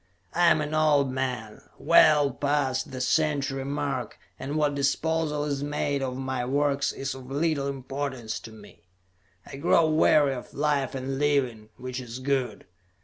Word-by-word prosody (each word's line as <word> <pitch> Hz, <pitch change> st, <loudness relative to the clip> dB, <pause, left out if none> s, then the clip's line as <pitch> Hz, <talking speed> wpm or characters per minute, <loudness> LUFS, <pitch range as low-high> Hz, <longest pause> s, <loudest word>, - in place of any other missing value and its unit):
I 175 Hz, 0 st, +4 dB
am 155 Hz, -, +3 dB
an 150 Hz, 0 st, -3 dB
old 150 Hz, -3 st, +3 dB
man, 125 Hz, -5 st, -4 dB, 0.2 s
well 145 Hz, -2 st, +5 dB
past 140 Hz, -1 st, -1 dB
the 130 Hz, -, -6 dB
century 140 Hz, -1 st, 0 dB
mark, 140 Hz, -4 st, -3 dB, 0.2 s
and 140 Hz, +3 st, -4 dB
what 150 Hz, -2 st, +1 dB
disposal 150 Hz, +2 st, 0 dB
is 140 Hz, -2 st, -2 dB
made 145 Hz, -1 st, -1 dB
of 130 Hz, -1 st, -3 dB
my 130 Hz, -1 st, -3 dB
work 140 Hz, +2 st, 0 dB
is 135 Hz, 0 st, -3 dB
of 130 Hz, -1 st, -11 dB
little 145 Hz, -1 st, 0 dB
importance 135 Hz, -3 st, -4 dB
to 115 Hz, -, -11 dB
me. 105 Hz, -2 st, -15 dB, 0.6 s
I -, -, -9 dB
grow 160 Hz, +2 st, +3 dB
weary 155 Hz, -2 st, +4 dB
of 125 Hz, -, -9 dB
life 145 Hz, -3 st, 0 dB
and 135 Hz, +1 st, -3 dB
living, 130 Hz, -7 st, 0 dB
which 130 Hz, +1 st, -5 dB
is 120 Hz, -1 st, -7 dB
good. 130 Hz, -1 st, -2 dB
140 Hz, 155 wpm, -26 LUFS, 130-145 Hz, 0.6 s, well